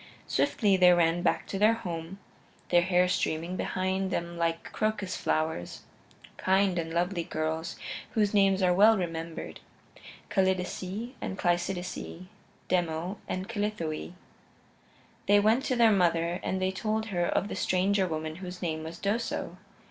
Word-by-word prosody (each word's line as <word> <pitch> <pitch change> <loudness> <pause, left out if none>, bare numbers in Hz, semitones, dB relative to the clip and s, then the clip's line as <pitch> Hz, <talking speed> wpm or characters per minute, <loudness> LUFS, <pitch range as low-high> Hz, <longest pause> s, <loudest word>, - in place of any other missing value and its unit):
Swiftly 205 -4 +2
they 180 -1 +6
ran 170 0 +3
back - - +1
to 195 - -4
their 215 +2 +5
home, 170 -3 -6 0.5
their 175 -1 +5
hair 180 0 +3
streaming 170 -1 -1
behind 190 +1 -1
them 170 -1 -3
like 165 -1 -2
crocus 215 -3 -1
flowers; 155 - -2 0.6
kind 190 -1 +2
and 165 -1 -3
lovely 175 +1 0
girls 160 0 -3 0.4
whose 210 -2 +2
names 195 -1 +4
are 180 -1 +4
well 215 +4 +6
remembered 165 -2 -5 0.7
Callidice 190 +4 -1
and 190 - -4
Cleisidice, 175 0 -2 0.4
Demo 175 +2 -1
and 185 +1 -3
Callithoe. 205 -8 -3 1.1
They 205 0 +6
went 220 +5 +3
to 255 - +1
their 230 -2 +5
mother 175 -2 +2
and 190 - -2
they 185 0 +1
told 220 +3 -2
her 175 -1 +1
of 200 - 0
the - - -5
stranger 190 +1 +1
woman 155 -1 -4
whose 180 -1 -7
name 160 -3 -2
was 160 +1 -7
Doso. 205 -4 -2
185 Hz, 140 wpm, -29 LUFS, 170-200 Hz, 1.1 s, they